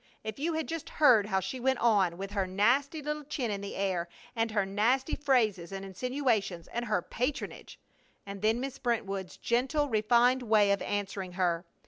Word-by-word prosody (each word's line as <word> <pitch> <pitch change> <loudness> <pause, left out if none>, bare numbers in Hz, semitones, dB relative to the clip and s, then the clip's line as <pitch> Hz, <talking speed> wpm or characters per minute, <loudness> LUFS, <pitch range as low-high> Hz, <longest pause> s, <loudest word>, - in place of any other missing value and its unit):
If 220 +3 -6
you 325 +3 0
had 315 0 -1
just 330 -2 -5
heard 240 -9 +6
how 190 -2 +1
she 255 +7 -4
went 265 +1 +1
on, 200 -8 +3
with 195 +1 -6
her 195 -2 -1
nasty 260 - +1
little 300 +1 -3
chin 260 -5 -3
in 200 -1 -3
the 200 - -6
air 185 -3 -1 0.3
and 225 0 +1
her 210 -2 +1
nasty 235 +9 +1
phrases 220 -11 +1
and 195 0 -5
insinuations, 215 - -1
and 240 +1 -3
her 210 -6 0
patronage! 255 +5 -4 0.5
And 200 -1 -7
then 220 +2 +2
Miss 270 +1 -5
Brentwood's 200 -7 -2
gentle, 270 +5 0
refined 240 +3 +3
way 215 -4 +4
of 200 - +1
answering 195 -2 -3
her! 175 -2 0
220 Hz, 180 wpm, -30 LUFS, 195-260 Hz, 0.5 s, heard